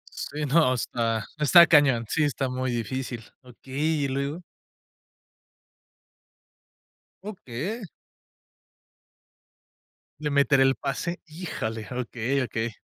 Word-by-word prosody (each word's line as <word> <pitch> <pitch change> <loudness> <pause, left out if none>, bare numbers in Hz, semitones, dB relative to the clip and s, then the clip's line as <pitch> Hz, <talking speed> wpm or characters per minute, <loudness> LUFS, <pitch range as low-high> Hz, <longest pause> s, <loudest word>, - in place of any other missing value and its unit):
Sí, 150 +1 -4
no 145 -2 +4
está 115 -2 -1
está 170 +4 +8
cañón. 145 -8 +4
Sí, 155 +7 +1
está 140 -2 0
muy 130 0 -2
difícil. 120 +1 -4 0.2
Okey, 135 +4 -3
¿y - - 0
luego? 140 +5 -3 2.8
Okey. 195 - -5 2.4
Le 150 -1 -2
meteré 140 -1 +3
el 135 0 +3
pase. 170 +5 -4
Híjale. 150 - -5
Okey, 125 +2 -2
okey. 115 -2 -3
135 Hz, 95 wpm, -26 LUFS, 120-150 Hz, 2.8 s, está